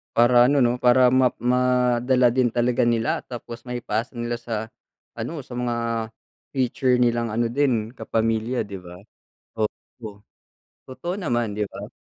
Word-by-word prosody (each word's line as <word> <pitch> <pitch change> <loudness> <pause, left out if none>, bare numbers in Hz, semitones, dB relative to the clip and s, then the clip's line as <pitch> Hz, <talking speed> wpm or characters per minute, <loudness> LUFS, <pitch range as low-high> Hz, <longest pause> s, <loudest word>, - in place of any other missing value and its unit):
Para 120 +1 +6
ano 140 +1 +3
'no, 120 +1 +1
para 125 +1 +5
ma 130 0 +5
ma 125 +1 +2 0.4
madala 125 0 +3
din 125 -1 +2
talaga 120 +1 +1
nila 115 -1 +1
tapos 120 -1 -8
maipasa 120 -1 -3
nila 120 0 -3
sa, 110 -2 -4 0.5
ano, 140 +6 -5
sa 125 - -11
mga 120 -1 -1 0.8
future 130 -1 +1
nilang 120 -1 +1
ano 115 +1 +1
din 120 -5 +1
kapamilya 115 0 -1
'di 100 -1 -8
ba? 90 -1 -12 0.6
Oo, 105 -1 -6 0.7
totoo 150 +8 -5
naman 120 - -1
'di 105 0 -1
ba? 100 +2 -8
120 Hz, 145 wpm, -23 LUFS, 115-125 Hz, 0.8 s, Para